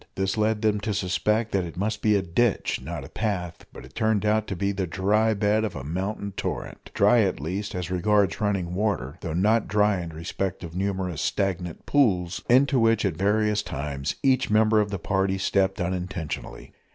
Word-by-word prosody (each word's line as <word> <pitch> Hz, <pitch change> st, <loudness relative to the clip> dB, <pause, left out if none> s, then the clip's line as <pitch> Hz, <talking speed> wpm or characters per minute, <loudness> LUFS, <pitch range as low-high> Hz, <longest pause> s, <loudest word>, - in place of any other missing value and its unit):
This 95 Hz, 0 st, 0 dB
led 110 Hz, 0 st, 0 dB
them 105 Hz, -1 st, +2 dB
to 105 Hz, -1 st, -2 dB
suspect 105 Hz, +4 st, 0 dB
that 95 Hz, -2 st, +1 dB
it 85 Hz, -1 st, -8 dB
must 105 Hz, +3 st, -2 dB
be 105 Hz, -1 st, +3 dB
a 100 Hz, -, +1 dB
ditch, 100 Hz, +6 st, 0 dB
not -, -, -6 dB
a -, -, -11 dB
path; 95 Hz, -6 st, -3 dB
but -, -, -11 dB
it 65 Hz, -, -16 dB
turned 110 Hz, 0 st, +1 dB
out 110 Hz, 0 st, +2 dB
to 95 Hz, -, -3 dB
be 100 Hz, +3 st, 0 dB
the 95 Hz, -2 st, -2 dB
dry 105 Hz, +5 st, +2 dB
bed 105 Hz, +1 st, +2 dB
of 110 Hz, -, -3 dB
a 65 Hz, -, -5 dB
mountain 95 Hz, +6 st, -3 dB
torrent 95 Hz, -, -5 dB
dry, -, -, +5 dB
at -, -, 0 dB
least, 95 Hz, +8 st, -4 dB
as 90 Hz, -1 st, -4 dB
regards 100 Hz, 0 st, +2 dB
running 95 Hz, -4 st, 0 dB
water, 90 Hz, -7 st, -2 dB
though 80 Hz, -2 st, -4 dB
not 105 Hz, +5 st, +2 dB
dry 105 Hz, -2 st, +2 dB
in 85 Hz, -, -6 dB
respect 85 Hz, +3 st, -4 dB
of 85 Hz, 0 st, -8 dB
numerous 95 Hz, -4 st, -2 dB
stagnant 90 Hz, -4 st, -2 dB
pools, 95 Hz, -11 st, +2 dB
into 130 Hz, +2 st, +4 dB
which 115 Hz, -2 st, +3 dB
at 95 Hz, -, +1 dB
various 105 Hz, +3 st, +1 dB
times 70 Hz, -4 st, -4 dB
each 135 Hz, -1 st, +3 dB
member 110 Hz, 0 st, +4 dB
of 105 Hz, -, -2 dB
the 100 Hz, -, -3 dB
party 95 Hz, +1 st, 0 dB
stepped 95 Hz, 0 st, +1 dB
unintentionally. 90 Hz, -8 st, -4 dB
100 Hz, 195 wpm, -25 LUFS, 90-105 Hz, -, dry